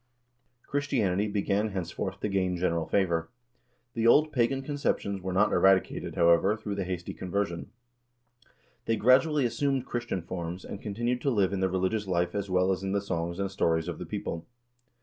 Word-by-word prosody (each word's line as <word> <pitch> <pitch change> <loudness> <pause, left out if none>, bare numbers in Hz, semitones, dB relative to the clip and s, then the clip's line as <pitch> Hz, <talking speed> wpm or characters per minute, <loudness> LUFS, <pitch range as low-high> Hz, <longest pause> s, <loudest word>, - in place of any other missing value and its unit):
Christianity 110 -9 0
began 100 0 0
henceforth 95 +1 -4
to - - 0
gain 95 -3 0
general 85 -2 0
favor. 85 -4 +1 0.6
The 115 0 +1
old 155 +6 +5
pagan 135 +2 +1
conceptions 135 -9 -1
were 95 0 -3
not 100 +3 +3
eradicated, 95 -1 +2
however, 85 +5 +4
through 105 -2 -5
the 100 -2 -2
hasty 90 -1 -4
conversion. 90 -2 -3 1.2
They 115 - +1
gradually 135 +5 +4
assumed 130 +2 0
Christian 120 -7 -3
forms 85 0 -5
and 100 - -7
continued 120 +4 -2
to 140 - +1
live 100 -6 +2
in 100 - -1
the 95 0 +1
religious 95 +3 -1
life 90 -1 0
as 100 -1 -3
well 90 +1 +2
as 95 - -1
in 95 0 -2
the 100 - +2
songs 85 -3 -3
and 100 -1 -2
stories 80 -3 +1
of 90 - -5
the - - -6
people. 85 - -4
100 Hz, 170 wpm, -28 LUFS, 90-115 Hz, 1.2 s, old